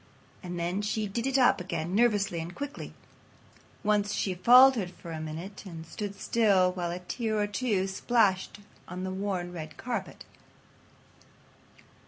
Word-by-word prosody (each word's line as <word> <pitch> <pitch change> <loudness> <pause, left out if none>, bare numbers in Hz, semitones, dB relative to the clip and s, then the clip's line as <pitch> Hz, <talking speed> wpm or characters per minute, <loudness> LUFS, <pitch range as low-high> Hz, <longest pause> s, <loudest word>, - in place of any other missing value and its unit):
And 175 -2 -5
then 175 +4 -1
she 210 +1 -1
did 230 +5 -2
it 270 0 +2
up 250 -7 +4
again 175 -1 -3
nervously 210 -5 +2
and 165 +2 -6
quickly. 285 0 -6 0.9
Once 205 0 +1
she 190 - -1
faltered 240 +1 +6
for 170 -1 -11
a 160 -1 -5
minute 165 +6 -7
and 165 -5 -9
stood 200 +4 -6
still 200 -5 +3
while 180 -2 -3
a 175 - -3
tear 215 +4 -3
or 205 - +2
two 205 -2 0
splashed 195 -1 +1 0.3
on 180 +1 -6
the 190 - -3
worn 190 -2 -3
red 155 -2 -8
carpet. 245 0 -5
195 Hz, 150 wpm, -29 LUFS, 180-215 Hz, 0.9 s, faltered